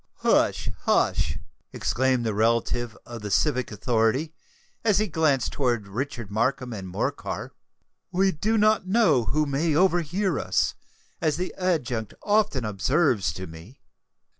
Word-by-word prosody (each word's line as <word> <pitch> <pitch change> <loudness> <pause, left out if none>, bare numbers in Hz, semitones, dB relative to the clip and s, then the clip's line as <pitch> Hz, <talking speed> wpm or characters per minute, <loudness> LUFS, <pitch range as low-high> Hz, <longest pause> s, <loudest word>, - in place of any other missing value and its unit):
"Hush! - - +2 0.2
hush!" 75 -1 +2 0.3
exclaimed 130 -1 0
the 110 - 0
relative 115 +2 0
of 120 -2 -8
the 105 - -5
civic 130 +4 +1
authority, 115 +7 0 0.5
as 215 -4 +3
he 215 - +2
glanced 155 - +1
towards 120 -7 -1
Richard 120 0 -5
Markham 125 +3 0
and 95 -3 -6
Morcar; 90 - -3 0.6
"we 190 +2 +3
do 215 +7 0
not 215 -2 +3
know 185 - +3
who 155 +5 +1
may 145 +2 0
overhear 175 +1 +2
us, - - +1 0.5
as 155 -2 +1
the 180 +1 -3
adjunct 130 - -1
often 205 - +2
observes 115 - +1
to 95 - -6
me." 85 +9 -13
130 Hz, 135 wpm, -25 LUFS, 115-170 Hz, 0.6 s, as